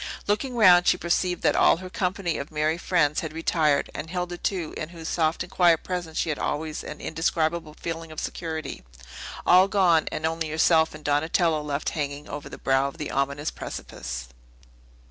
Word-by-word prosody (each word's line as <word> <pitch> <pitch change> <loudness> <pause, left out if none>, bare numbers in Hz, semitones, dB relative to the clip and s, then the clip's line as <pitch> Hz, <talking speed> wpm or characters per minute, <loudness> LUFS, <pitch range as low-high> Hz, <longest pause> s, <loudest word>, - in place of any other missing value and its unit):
Looking 230 +5 -1
round, 180 -6 +6
she - - +5
perceived 175 +1 0
that - - +3
all - - +5
her 185 +1 -8
company 185 -1 -2
of 140 - -6
merry 155 +2 0
friends 155 -5 +2
had 160 -2 -5
retired, 160 -3 +1
and 155 +2 -6
Hilda, 180 0 -3
too, 180 -6 -2
in 155 - -5
whose 165 -2 -8
soft 160 0 0
and 180 - -12
quiet 170 -3 +4
presence 175 -3 -4
she - - 0
had 150 - -2
always 155 +1 -3
an 150 - -8
indescribable 160 -1 -1
feeling 165 -1 -5
of 155 - -6
security. 160 - -5 0.6
All 185 +2 +7
gone; 180 -5 +3
and 155 - -3
only 160 0 -1
herself 160 0 +3
and 155 - -11
Donatello 160 +2 +2
left 145 -1 -2
hanging 145 -1 -4
over 145 0 -7
the - - -9
brow 135 +1 +2
of 140 - -8
the 150 -3 -4
ominous 140 +2 -1
precipice. - - -7
160 Hz, 185 wpm, -25 LUFS, 150-175 Hz, 0.6 s, All